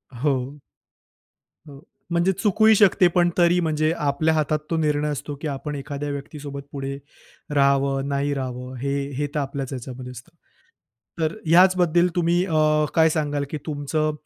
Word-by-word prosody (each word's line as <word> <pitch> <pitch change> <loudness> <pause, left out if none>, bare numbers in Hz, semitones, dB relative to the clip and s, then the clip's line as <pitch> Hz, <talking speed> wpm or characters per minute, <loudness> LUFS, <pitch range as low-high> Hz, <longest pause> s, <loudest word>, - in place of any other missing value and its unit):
हो. 135 +2 -2 1.1
हो. 140 -1 -12 0.3
म्हणजे 170 +2 +2
चुकूही 215 +3 +3
शकते 195 -2 +5
पण 175 -1 +4
तरी 175 0 +4
म्हणजे 155 -2 +1
आपल्या 150 +2 +1
हातात 155 0 0
तो 165 - 0
निर्णय 150 -1 0
असतो 145 0 -5
की 160 - -3
आपण 145 +1 -4
एखाद्या 140 +1 -5
व्यक्तीसोबत 140 0 -6
पुढे 140 0 -5 0.6
राहावं, 140 0 +2
नाही 140 +1 0
रहावं, 130 -1 -5
हे 140 +3 -2 0.2
हे 145 - -1
तर 150 - 0
आपल्याच 135 -1 -4
ह्याच्यामध्ये 125 0 -7
असतं. 125 +7 -12 0.9
तर 160 0 0
ह्याचबद्दल 175 0 +4
तुम्ही 175 +1 +2
अ, 155 -3 +2
काय 160 0 +5
सांगाल 145 -2 -1
की 155 - -4
तुमचं 155 +1 -1
150 Hz, 145 wpm, -23 LUFS, 140-165 Hz, 1.1 s, शकते